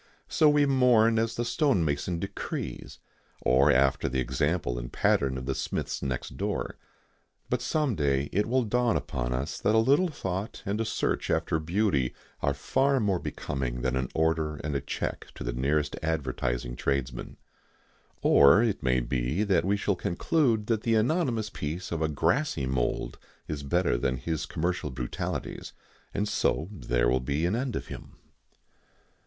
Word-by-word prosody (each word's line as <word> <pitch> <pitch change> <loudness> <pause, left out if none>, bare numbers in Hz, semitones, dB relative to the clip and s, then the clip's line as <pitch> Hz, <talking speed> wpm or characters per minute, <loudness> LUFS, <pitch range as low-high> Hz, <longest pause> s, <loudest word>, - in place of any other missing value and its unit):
So 155 - +4
we 145 -1 +4
mourn 120 -4 +4
as 115 0 0
the 120 - -1
stonemason 90 - +1
decrees, 95 +4 -5 0.4
or 65 +4 +4
after 65 0 +3
the 65 +1 -1
example 65 0 0
and - - -7
pattern 65 -1 +2
of 65 - -5
the 65 - -1
Smiths - - -3
next 65 -3 -4
door. - - -2 0.8
But 125 0 +1
some 145 0 0
day 70 -4 +1
it 105 +3 +1
will 130 +2 +2
dawn 120 +1 +2
upon - - -3
us 65 +6 -2
that 105 +2 +2
a - - +5
little 140 +11 +4
thought 95 - -4
and 105 +3 -1
a - - 0
search - - -1
after 80 - +1
beauty 80 - 0 0.3
are 70 -1 +1
far 135 - +2
more 100 -5 +1
becoming 60 -3 -4
than 65 0 0
an 65 -1 -1
order 80 -1 +1
and 75 -1 -2
a 70 - 0
cheque - - -4
to - - -6
the - - -2
nearest 70 +4 0
advertising 65 -6 -2
tradesman. 65 -2 -2 0.9
Or 70 +11 +7
it 110 -4 0
may 65 -1 +2
be 65 - -1 0.2
we 100 +3 +1
shall 100 0 0
conclude 110 - +1
that 110 -1 0
the 115 0 +2
anonymous 115 -3 +1
peace 80 +5 -4
of 85 -2 -2
a 80 - +1
grassy 80 - +1
mould 65 -2 -1 0.3
is 75 -2 -4
better 80 -3 +1
than 65 0 0
his 80 +5 -3
commercial 85 -2 -2
brutalities, 65 -2 -4 0.4
and 105 - -1
so 80 -5 0
there - - 0
will 65 +2 +3
be 70 +6 -1
an 90 +5 +1
end 125 -1 -2
of - - -3
him. - - -9
80 Hz, 165 wpm, -28 LUFS, 65-110 Hz, 0.9 s, Or